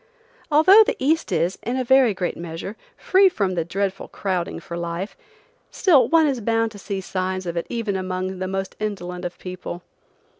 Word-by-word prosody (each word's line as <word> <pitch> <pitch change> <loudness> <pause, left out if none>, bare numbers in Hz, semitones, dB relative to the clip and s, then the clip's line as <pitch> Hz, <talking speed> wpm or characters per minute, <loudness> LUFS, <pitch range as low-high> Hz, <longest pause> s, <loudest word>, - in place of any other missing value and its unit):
Although 370 +9 +8
the 480 +2 -1
East 315 +1 +1
is, 170 +2 0
in 245 +2 -2
a 260 - 0
very 255 -4 +4
great 180 -2 -2
measure, 170 +4 -6 0.2
free 385 +1 +4
from 195 - -1
the 170 -2 0
dreadful 195 +3 -3
crowding 185 -2 -3
for 170 - -8
life, 170 +3 -4 0.5
still 285 - +4
one 325 +1 +4
is 270 -5 0
bound 225 +1 +1
to 205 - -11
see 195 0 -4
signs 185 0 -3
of 170 -1 -4
it 170 - -3
even 230 -4 -2
among 185 0 -3
the 185 - -2
most 195 0 -4
indolent 180 -4 -4
of 175 - -5
people. 180 -1 -7
195 Hz, 185 wpm, -23 LUFS, 180-240 Hz, 0.5 s, Although